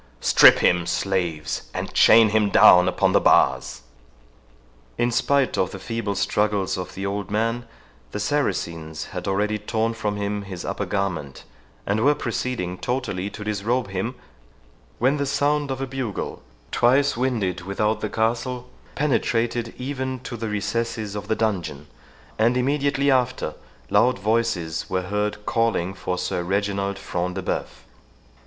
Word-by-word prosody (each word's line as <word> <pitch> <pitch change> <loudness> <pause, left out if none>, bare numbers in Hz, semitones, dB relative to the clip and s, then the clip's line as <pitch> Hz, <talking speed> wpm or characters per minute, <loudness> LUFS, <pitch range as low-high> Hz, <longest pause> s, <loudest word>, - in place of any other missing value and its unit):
—Strip - - +7
him, 90 -1 +3
slaves, 90 -5 -2
and - - -4
chain 115 -1 +7
him 105 -1 +2
down 90 -2 +7
upon 95 +1 +2
the - - +4
bars." - - +3 1.1
In 120 0 +1
spite 140 +1 +1
of 95 - +1
the 95 - -7
feeble 100 0 -3
struggles 100 -1 0
of 90 -1 -6
the 95 - -4
old 100 -1 -3
man, 115 +3 -1 0.4
the - - -4
Saracens 80 -2 -2
had - - -5
already 105 +2 0
torn 110 +2 -1
from 105 -2 -2
him 100 0 -2
his 95 -3 -7
upper - - -3
garment, 90 -9 -3 0.4
and 105 +3 0
were 145 +2 +4
proceeding 115 -8 -3
totally 110 -7 -2
to 105 - -8
disrobe 105 +2 -1
him, 100 +7 -3 0.8
when 130 +5 +2
the 140 - -1
sound 145 +1 +1
of 135 0 -3
a - - 0
bugle, 130 -5 -4 0.3
twice 135 +4 +3
winded 115 -8 -1
without 105 +4 -1
the 105 - -2
castle, 120 +3 -1 0.3
penetrated 120 -4 0
even 130 0 -3
to 125 - -6
the 115 -1 -4
recesses 105 +1 -2
of 105 0 -6
the 110 - +1
dungeon, 105 -7 -2 0.5
and 120 +3 +3
immediately 140 +1 +1
after 125 - 0 0.4
loud 120 +5 +4
voices 100 -6 -1
were 95 0 -1
heard 105 +2 -2
calling 115 -6 0
for 90 -1 -3
Sir 90 -1 -2
Reginald 100 +1 -1
Front 90 -2 -3
de 95 - -4
Bœuf. - - -2
105 Hz, 150 wpm, -23 LUFS, 95-120 Hz, 1.1 s, Strip